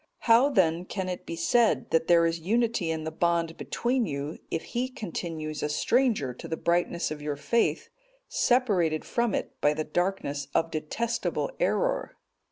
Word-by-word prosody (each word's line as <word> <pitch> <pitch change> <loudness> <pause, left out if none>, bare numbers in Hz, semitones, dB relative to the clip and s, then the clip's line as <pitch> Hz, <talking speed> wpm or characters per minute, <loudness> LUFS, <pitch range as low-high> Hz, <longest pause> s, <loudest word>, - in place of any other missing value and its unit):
'(223) 230 - +6
How 250 +5 +6 0.2
then 170 +2 -6
can 190 0 -4
it 180 - -6
be 170 - -4
said, 225 +8 +2
that 165 0 +2
there 170 -1 +5
is 165 0 0
unity 220 0 0
in 160 -1 -2
the 160 - -4
bond 170 0 0
between 240 -2 -1
you, 140 +2 -4
if 165 - -2
he 250 +1 -2
continues 165 - -5
a 150 - -1
stranger 220 - +1
to - - -9
the 160 - -3
brightness 170 0 0
of 150 -1 -5
your 145 -1 -2
faith, 230 +11 0 0.4
separated 195 -11 +2
from 235 -3 0
it - - -5
by 150 +1 +3
the 155 - -1
darkness 150 -5 -2
of 165 0 +2
detestable 225 - -2
error? - - 0
170 Hz, 175 wpm, -27 LUFS, 155-235 Hz, 0.4 s, 223